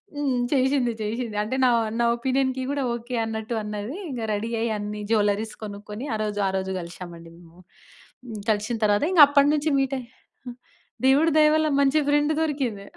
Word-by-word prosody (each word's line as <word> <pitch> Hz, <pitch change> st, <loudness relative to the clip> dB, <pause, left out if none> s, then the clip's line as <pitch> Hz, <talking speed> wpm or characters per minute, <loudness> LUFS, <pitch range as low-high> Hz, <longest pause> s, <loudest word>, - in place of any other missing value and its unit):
హ్మ్. 275 Hz, -4 st, 0 dB
చేశింది. 260 Hz, -2 st, +2 dB
చేశింది. 220 Hz, 0 st, -3 dB
అంటే 225 Hz, +5 st, -3 dB
నా -, -, +5 dB, 0.3 s
నా 235 Hz, -, +3 dB
ఒపీనియన్‌కి 260 Hz, +1 st, 0 dB
గూడా 285 Hz, -1 st, -1 dB
ఓకే. 240 Hz, +1 st, -6 dB
అన్నట్టు 220 Hz, +1 st, -4 dB
అన్నది. 210 Hz, -, -5 dB
ఇంగ 250 Hz, -4 st, -5 dB
రెడీ 210 Hz, +2 st, -3 dB
అయ్యి 230 Hz, 0 st, 0 dB
అన్ని 210 Hz, 0 st, -5 dB
జ్యువెల్లరీస్ 210 Hz, 0 st, +1 dB
కొనుక్కొని 210 Hz, +5 st, -7 dB
ఆరోజు 210 Hz, -1 st, -2 dB
ఆరోజు 190 Hz, 0 st, -2 dB
కలిశామండి 170 Hz, -1 st, -9 dB
మేము. 170 Hz, 0 st, -18 dB, 0.7 s
హ్మ్. 225 Hz, -3 st, -7 dB
కలిసిన 215 Hz, +3 st, -1 dB
తరువాత 205 Hz, +2 st, +2 dB
ఇంగ 355 Hz, -4 st, +6 dB
అప్పటినుంచి 290 Hz, +2 st, +3 dB
మీట్ 270 Hz, 0 st, 0 dB
అయ్ 245 Hz, -, -10 dB, 1.0 s
దేవుడి 295 Hz, +5 st, +4 dB
దయ 305 Hz, -, +6 dB
వల్ల 315 Hz, 0 st, +2 dB
మంచి 280 Hz, +2 st, +3 dB
ఫ్రెండ్ 295 Hz, +1 st, +2 dB
దొరికింది. 265 Hz, -10 st, -2 dB
235 Hz, 155 wpm, -24 LUFS, 210-275 Hz, 1.0 s, ఇంగ